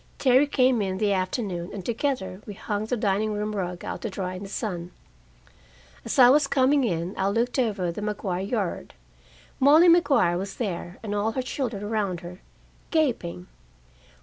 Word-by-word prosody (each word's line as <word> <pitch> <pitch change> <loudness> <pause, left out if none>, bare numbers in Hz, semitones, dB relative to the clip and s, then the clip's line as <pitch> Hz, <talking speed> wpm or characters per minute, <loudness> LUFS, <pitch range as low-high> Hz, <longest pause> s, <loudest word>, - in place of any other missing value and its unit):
Terry 265 +2 +4
came 255 -4 +3
in 190 -1 -2
the 205 0 +1
afternoon, 185 -2 -2
and 190 -3 -7
together 235 -6 -2
we 205 - -7
hung 215 0 -3
the 250 - -1
dining 210 +1 0
room 210 +1 -3
rug 180 -3 -4
out - - -5
to 225 - -3
dry 185 -2 -4
in 185 - -7
the 200 - -7
sun. 180 -6 -4 1.1
As - - -3
I 250 -2 +9
was 280 +2 +5
coming 275 +1 +3
in, 175 -4 -1
I 190 - +2
looked 235 +6 0
over 215 -7 0
at 170 - -1
the 210 - -6
Maguire 205 -3 -2
yard. 195 - -3 0.6
Molly 300 +6 +7
Maguire 275 - +4
was 195 0 -5
there, 180 -5 -4
and 210 -2 -3
all 210 +2 0
her 260 - -2
children 240 -6 -3
around 205 -5 -2
her, 175 +1 -10 0.5
gaping. 235 - 0
210 Hz, 175 wpm, -25 LUFS, 185-250 Hz, 1.1 s, I